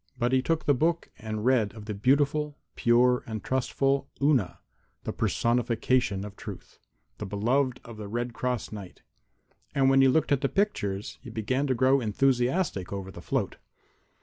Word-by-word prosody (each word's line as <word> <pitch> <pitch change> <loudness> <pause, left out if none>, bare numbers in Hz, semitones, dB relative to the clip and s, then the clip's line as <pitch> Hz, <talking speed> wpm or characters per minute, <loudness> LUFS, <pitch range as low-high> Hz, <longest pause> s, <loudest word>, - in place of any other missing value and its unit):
But 120 +1 +1
he 130 0 +3
took 165 +4 -1
the 145 - +4
book 165 +5 0
and 110 0 -4
read 115 -5 +2
of 105 -2 -9
the 105 - -4
beautiful, 145 +6 +1 0.2
pure 125 +1 +4
and 110 -2 -5
trustful 135 +1 0
Una, 140 -10 +2 0.5
the - - -3
personification 115 -3 +1
of 100 -1 -9
Truth, - - -10 0.4
the - - -4
beloved 125 +6 +1
of 115 -2 -10
the 105 -1 -6
Red 120 +3 -3
Cross 125 -1 -2
Knight. 100 -4 -9 0.7
And 135 -1 +4
when 135 0 +5
he 135 - +6
looked 150 +4 +2
at 140 -2 +3
the 140 - +1
pictures 105 - -1
he 130 - -10
began 125 +6 -1
to 130 - +1
grow 130 +2 +4
enthusiastic 125 - +1
over 95 -1 -5
the - - -10
float. - - -2
125 Hz, 170 wpm, -28 LUFS, 110-135 Hz, 0.7 s, he